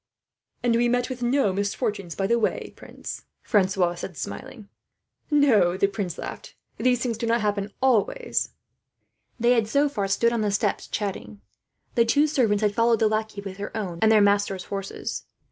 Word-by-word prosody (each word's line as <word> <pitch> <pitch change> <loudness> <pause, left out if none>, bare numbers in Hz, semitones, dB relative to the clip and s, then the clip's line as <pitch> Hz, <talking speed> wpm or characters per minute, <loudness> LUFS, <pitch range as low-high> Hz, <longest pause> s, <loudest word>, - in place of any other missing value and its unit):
"And 240 -1 +3
we 240 +1 +3
met 245 +1 0
with 250 -1 -6
no 240 -4 +2
misfortunes 200 -2 -2
by 195 - -1
the 235 +4 +2
way, 220 - -1
prince," - - -9 0.2
Francois 190 -3 +2
said, 175 -1 -7
smiling. 250 - -7 0.6
"No," 235 - +4
the 200 - +3
prince 195 -3 -3
laughed, - - -8 0.2
"these 250 -1 +2
things 230 -3 -2
do 230 - -2
not 230 0 +2
happen 205 -1 -1
always." 265 - +1 0.9
They 240 +1 +4
had 230 -3 +3
so 280 +6 +3
far 205 -8 -2
stood 235 +4 +2
on 230 - 0
the 210 - +1
steps, 205 0 -1
chatting. 145 - -4 0.5
The 235 - +4
two 285 +6 +3
servants 230 -9 +1
had 205 -1 +2
followed 230 +1 +3
the 220 - +3
lackey, 215 -1 -2
with 195 -1 -7
their 205 +2 -5
own 180 -6 -4
and 220 0 +5
their 215 -1 +6
masters' 200 -2 +2
horses. 195 -1 -5
215 Hz, 180 wpm, -25 LUFS, 200-240 Hz, 0.9 s, their